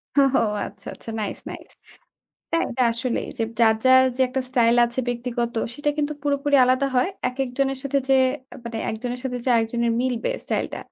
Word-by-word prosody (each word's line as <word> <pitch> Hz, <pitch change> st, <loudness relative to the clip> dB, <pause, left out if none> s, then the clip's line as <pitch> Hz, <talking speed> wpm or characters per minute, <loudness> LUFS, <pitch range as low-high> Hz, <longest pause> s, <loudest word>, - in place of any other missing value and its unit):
হোহো! 275 Hz, -2 st, +4 dB, 0.3 s
আচ্ছা। 200 Hz, -1 st, -11 dB
আচ্ছা। -, -, -11 dB
Nice! 210 Hz, -, -4 dB
Nice! -, -, -9 dB, 0.8 s
টা 330 Hz, -, +1 dB
এটা 250 Hz, +1 st, -1 dB
আসলেই। 235 Hz, +1 st, -2 dB
যে -, -, 0 dB, 0.2 s
যার, 220 Hz, -1 st, +6 dB
যার 260 Hz, 0 st, +7 dB
যে -, -, -4 dB
একটা 260 Hz, +1 st, -2 dB
স্টাইল 240 Hz, -2 st, +3 dB
আছে 240 Hz, +2 st, -1 dB
ব্যক্তিগত, 240 Hz, 0 st, -2 dB, 0.2 s
সেটা 290 Hz, +3 st, 0 dB
কিন্তু 300 Hz, 0 st, 0 dB
পুরোপুরি 285 Hz, 0 st, +2 dB
আলাদা 255 Hz, +2 st, +2 dB
হয়। 250 Hz, +9 st, +3 dB, 0.2 s
একেকজনের 270 Hz, +1 st, -2 dB
সাথে 275 Hz, 0 st, 0 dB
যে 270 Hz, -, +5 dB, 0.5 s
মানে 230 Hz, -1 st, -5 dB
একজনের 245 Hz, +3 st, -4 dB
সাথে 250 Hz, -1 st, -2 dB
যে -, -, -1 dB
আরেকজনের 235 Hz, +1 st, +1 dB
মিলবে 250 Hz, -, -1 dB
স্টাইলটা, -, -, -2 dB
250 Hz, 170 wpm, -23 LUFS, 235-270 Hz, 0.8 s, যার